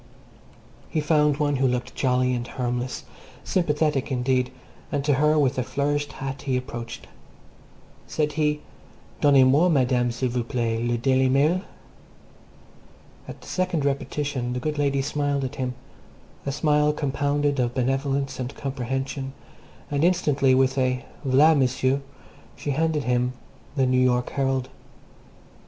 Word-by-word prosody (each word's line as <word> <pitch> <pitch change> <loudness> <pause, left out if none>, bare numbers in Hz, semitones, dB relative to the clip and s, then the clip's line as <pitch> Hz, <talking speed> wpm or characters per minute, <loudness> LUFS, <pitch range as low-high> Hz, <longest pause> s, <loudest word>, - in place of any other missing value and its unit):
He 160 - 0
found 150 -1 +3
one 145 -2 +1
who 135 0 +3
looked 125 0 -2
jolly 125 -1 +1
and 120 -1 -3
harmless, 125 0 -3 0.4
sympathetic 150 -5 0
indeed, 125 0 +1 0.4
and 140 -2 -1
to 145 - +3
her, 150 +3 +3
with 135 -3 +2
a - - +1
flourished 145 +3 -1
hat, 135 0 -5
he 135 -2 0
approached. 120 -2 -6 1.0
Said 150 -1 0
he, 150 -1 0 0.6
"Donnez 140 -3 +6
moi, 145 +7 +4
Madame, 125 -5 +2
s'il 120 +2 -1
vous 120 0 -1
plaît, 115 -1 -1
le 120 0 +1
Daily 130 +2 +2
Mail." 150 +7 +3 1.7
At - - -9
the - - -14
second 180 -5 -1
repetition 140 -2 -2
the 125 - -2
good 150 +3 -3
lady 140 -1 +1
smiled 145 -1 -1
at 130 - -5
him, 125 -1 -2 0.7
a - - +1
smile 150 +1 +2
compounded 145 0 0
of 120 0 0
benevolence 135 +2 -1
and 125 +1 -4
comprehension, 135 0 -3 0.6
and 145 +1 +1
instantly, 150 -7 +3
with 135 +1 +2
a 125 -1 0 0.2
"V'la 145 +4 +5
M'sieu," 130 0 +1 0.5
she 145 - -3
handed 155 0 0
him 125 0 +1 0.4
The 135 -3 +3
New 130 0 +3
York 125 -1 +2
Herald. 135 -2 0
135 Hz, 140 wpm, -24 LUFS, 125-145 Hz, 1.7 s, Donnez